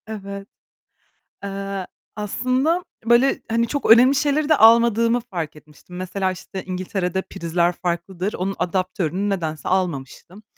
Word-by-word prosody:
Evet. 200 -2 -7 1.0
Eee, 195 -1 -4 0.3
aslında 255 - 0 0.2
böyle, 240 +4 +3
hani, 230 +1 +1
çok 280 -1 +1
önemli 250 +4 +7
şeyleri 295 +1 +1
de 310 - +6
almadığımı 230 +1 +5
fark 165 -5 -4
etmiştim. 150 +3 -15
Mesela, 185 +1 -2
işte, 185 +1 -7
İngiltere'de 185 0 -2
prizler 170 -2 -1
farklıdır. 180 +3 -3
Onun 195 +2 -3
adaptörünü 185 +1 -1
nedense 160 -6 -3
almamıştım. 180 +2 -3
195 Hz, 120 wpm, -22 LUFS, 180-230 Hz, 1.0 s, önemli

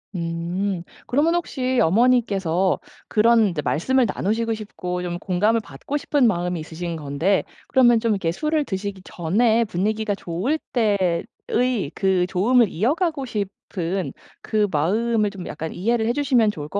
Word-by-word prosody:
음. 170 +2 -2 0.2
그러면 295 +6 +2
혹시 260 -7 -1
어머니께서 195 -4 +2 0.3
그런 220 -2 +4
말씀을 260 +11 +2
나누시고 225 +3 -1
싶고 180 -4 -5
좀 175 -1 -3
공감을 205 +6 +1
받고 210 - -5
싶은 285 -3 +2
마음이 180 -3 -1
있으신 165 +2 -5
건데 155 +6 0 0.2
그러면 240 -3 +5
좀 230 0 0
이렇게 190 -5 0
술을 305 - 0
드시기 195 -2 -4
전에 220 +9 +1
분위기가 215 +3 -1
좋을 195 - -2
때의 205 - 0
그 190 -2 +2
좋음을 230 +5 +3
이어가고 280 - 0
싶은 195 -4 -4 0.3
그 215 -1 +1
마음을 210 +8 +1
좀 190 -3 -8
약간 160 +1 -5
이해를 220 +5 0
해 235 - +2
주시면 250 -6 +3
좋을 150 -6 -7
것 200 - -2
205 Hz, 310 characters per minute, -22 LUFS, 180-235 Hz, 0.3 s, 그러면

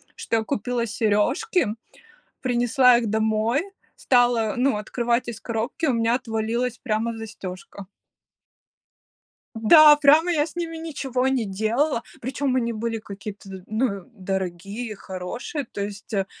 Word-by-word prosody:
что 230 - -1
я 220 - 0
купила 235 0 -2
сережки, 215 - +1 0.8
принесла 245 0 +4
их 235 - -2
домой, 220 +4 +1 0.4
стала, 240 -4 +2
ну, 255 -1 +2
открывать 235 +3 -1
из 225 -2 -6
коробки, 230 +8 -2
у 265 - +2
меня 230 0 +2
отвалилась 235 0 -2
прямо 225 -1 -2
застежка. 200 -3 -8 1.7
Да, 295 +7 +8
прямо 300 +4 +5
я 300 -3 +2
с 325 - -12
ними 335 -1 -3
ничего 270 -6 -2
не 260 -4 0
делала, 230 +7 0 0.2
причем 265 +1 -1
они 235 -2 0
были 225 0 -3
какие-то, 195 -2 -9
ну, 215 -3 -1
дорогие, 195 +3 -4
хорошие, 210 - -5
то 220 -4 -7
есть, 205 +2 -7
э, 195 -2 +1
230 Hz, 130 wpm, -24 LUFS, 215-255 Hz, 1.7 s, Да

